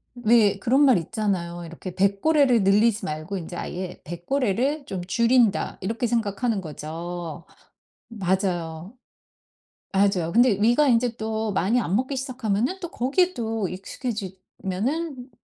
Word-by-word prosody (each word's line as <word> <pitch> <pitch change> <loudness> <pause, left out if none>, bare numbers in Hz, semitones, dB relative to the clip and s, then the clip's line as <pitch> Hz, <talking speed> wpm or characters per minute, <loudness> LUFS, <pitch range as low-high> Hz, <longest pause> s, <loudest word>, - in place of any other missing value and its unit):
왜 230 -3 +3
그런 260 +4 +3
말 260 -7 +6
있잖아요. 175 -2 -2
이렇게 170 +2 -8
'뱃고래를 235 +5 +3
늘리지 210 +3 +3
말고 155 +6 -4
인제 175 0 -7
아예 180 +1 -5
뱃고래를 250 - -1
좀 185 -2 -5
줄인다.' 235 +2 +2
이렇게 225 +5 -2
생각하는 225 -1 0
거죠. 165 +1 -6 0.6
맞아요. 185 -3 -2 1.0
맞아요. 190 -4 +2
근데 240 +2 +5
위가 240 +7 +4
인제 240 -1 +2
또 220 0 -2
많이 205 +6 +2
안 195 -4 -1
먹기 260 +4 0
시작하면은 255 - -1
또 345 - -5
거기에 355 +9 +1
또 225 - -2
익숙해지면은 220 - -4
215 Hz, 290 characters per minute, -24 LUFS, 185-245 Hz, 1.0 s, 말